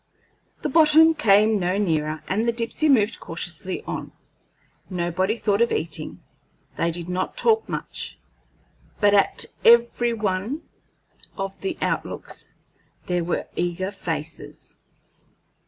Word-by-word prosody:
The - - 0
bottom 320 +2 +6
came 215 -6 +4
no 180 +1 0
nearer, 155 -5 -1
and 215 +5 0
the - - +4
Dipsey 235 +6 0
moved 220 -6 +3
cautiously - - -5
on. - - -5 0.8
Nobody 185 +4 -1
thought 205 -1 +1
of 235 - +3
eating; 155 -1 -3 0.5
they 170 - +1
did 170 0 -3
not 180 +1 -3
talk 445 -1 +2
much, - - -4 0.8
but 205 -1 +4
at 200 -1 +3 0.2
every 235 0 +5
one 210 +6 -2 0.7
of 195 -1 -5
the 370 -3 -3
outlooks - - -4 0.5
there 180 -1 0
were 170 - -2
eager 175 +2 -1
faces. - - -6
205 Hz, 120 wpm, -24 LUFS, 180-235 Hz, 0.8 s, bottom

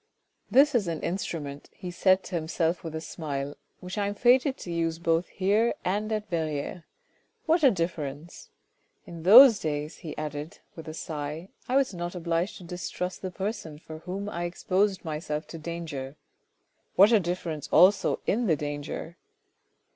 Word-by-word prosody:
"This 285 +3 +5
is 220 -7 +2
an 165 -2 -2
instrument," 155 -6 -4
he 180 - -7
said 185 +1 +3
to - - -10
himself 165 +1 -1
with 160 -2 -6
a 160 - -3
smile, 145 -4 -4
" - - -46
which 185 +2 -5
I 200 - +1
am 205 - -3
fated 255 +4 +4
to 175 - -7
use 165 -1 -1
both 165 +1 +1
here 205 +5 +1
and 210 +4 -1
at 215 -1 -2
Verrieres. 160 -1 -3 0.6
What 330 +1 +3
a 280 - +7
difference! 165 - -4 0.6
In 170 -1 -9
those 225 +5 +9
days," 150 0 -3
he 155 - -8
added 150 0 -5 0.2
with 165 - -9
a 155 - -6
sigh, 155 +3 -5
" - - -30
I 255 - +1
was 270 -6 +3
not 175 0 -5
obliged 170 +3 -1
to - - -12
distrust 180 +1 -5
the 185 - -3
person 185 -4 -4
for 155 0 -10
whom 190 +4 -5
I 175 -4 -3
exposed 190 +2 0
myself 155 -1 -3
to 165 - -7
danger. 155 -5 -5 0.8
What 200 +4 +7
a 225 - +6
difference 170 -4 -3
also 195 +3 +5
in 235 +2 +1
the 160 - +4
danger 145 +3 -5
170 Hz, 170 wpm, -27 LUFS, 155-195 Hz, 0.8 s, those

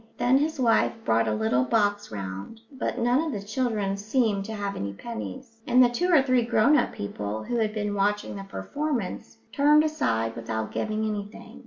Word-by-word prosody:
Then 245 +2 +3
his 310 0 -1
wife 230 -3 +3
brought 115 0 +2
a - - +1
little 110 +4 +1
box 205 - 0
round, 100 - -6
but 260 -2 -3
none 245 +3 +2
of 325 -1 -2
the 200 -4 -6
children 215 -4 -1
seemed 210 -1 0
to 220 - -6
have 200 -1 -3
any 100 0 -4
pennies, 230 - -8
and 250 +1 +6
the 245 - +5
two 350 +10 -1
or 305 -6 +6
three 255 -2 +3
grown 235 +4 +4
up - - +2
people 105 +1 -5
who 240 +1 -2
had 220 -2 +1
been 210 -1 -2
watching 205 +1 0
the 195 - -6
performance 250 +1 -4
turned 295 +3 +5
aside 115 - 0
without 110 -1 -4
giving 215 0 -2
anything. 210 -1 -6
215 Hz, 190 wpm, -26 LUFS, 195-255 Hz, -, and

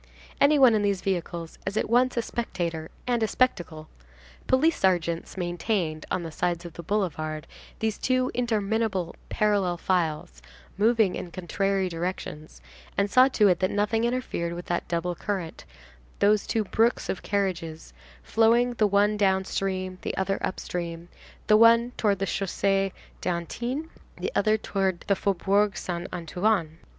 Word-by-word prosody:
Any 295 +2 +5
one 260 -4 +7
in 215 - +2
these 200 -2 0
vehicles 175 -3 -3
is 195 +2 -3
at - - +1
once 245 +2 +2
a 235 - +1
spectator 170 -9 -3 0.2
and 240 -2 0
a 220 - +2
spectacle. 175 -11 0 0.6
Police 310 +6 +3
sergeants 175 -2 0
maintained, 175 -2 -2
on 180 - -1
the 165 - -6
sides 175 +1 -1
of 170 - -8
the 170 - -7
boulevard, 155 -5 -2 0.3
these 220 -1 -2
two 255 0 +1
interminable 220 -6 -1
parallel 200 -4 +1
files, 160 - -1 0.3
moving 220 -2 +3
in 175 - -5
contrary 190 +2 -1
directions, 165 -3 -5 0.4
and 200 0 +1
saw 255 +1 +7
to 220 -6 +3
it 180 - +3
that 185 - +1
nothing 210 +2 0
interfered 235 -9 -1
with 175 +1 -7
that 175 - -2
double 175 +1 -1
current, 180 -2 -4 0.5
those 210 0 +3
two 225 - +1
brooks 225 +4 +1
of 190 - -3
carriages, 175 -6 -2 0.3
flowing, 235 +2 +3
the 215 -3 +2
one 205 +1 +3
downstream, 190 -1 0
the - - -4
other 195 +1 0
upstream, 170 -2 -4 0.4
the 215 - +5
one 230 +2 +6
towards 205 -5 0
the 195 - 0
Chaussée 195 0 0 0.3
d'Antin, 235 - -3 0.3
the - - -3
other 215 0 +3
towards 190 -4 -2
the 200 - +2
Faubourg 200 +2 +1
Saint 175 -1 -4
Antoine. 175 -1 -1
195 Hz, 150 wpm, -26 LUFS, 175-220 Hz, 0.6 s, one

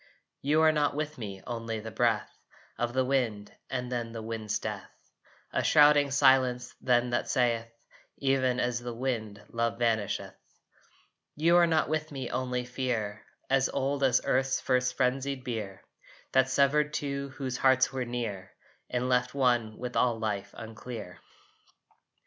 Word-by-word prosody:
You 150 +3 +3
are 160 - +6
not 150 -2 +1
with 155 -1 -3
me, 100 -4 -7
only 115 -2 -4
the 110 +1 -7
breath - - 0 0.4
Of 120 0 -1
the 130 0 +2
wind 120 -6 -1 0.2
and 125 -1 -3
then 120 -2 -3
the 115 - -5
wind's 110 -2 -3
death. - - -5 0.6
A - - +1
shrouding 145 -1 +6
silence 130 -2 +3
then 125 -1 +2
that 120 - -1
saith, 115 -2 +1 0.5
"Even 130 -2 +1
as 125 -1 0
wind 115 -4 -4
love 115 0 -1
vanisheth." 115 -4 0 1.0
You 165 +3 +3
are 175 -1 +6
not 160 -2 +2
with 155 0 -2
me 135 -3 -5
only 125 -1 -2
fear, 120 -4 -3 0.2
As 135 -1 +2
old 140 +1 -1
as 130 -3 +4
earth's 130 0 +1
first 125 -1 +1
frenzied 130 +1 0
bier 110 -6 -5 0.5
That 130 0 +3
severed 145 +3 +2
two 140 -2 -3
whose 130 -2 -3
hearts 130 0 +4
were 130 -1 -1
near, 115 -6 -5 0.4
And 125 0 -1
left 125 +1 +1
one 120 -5 +1
with 125 -1 -5
all 120 -2 +2
Life 105 -2 -2
unclear. 115 -3 -8
125 Hz, 150 wpm, -29 LUFS, 115-135 Hz, 1.0 s, are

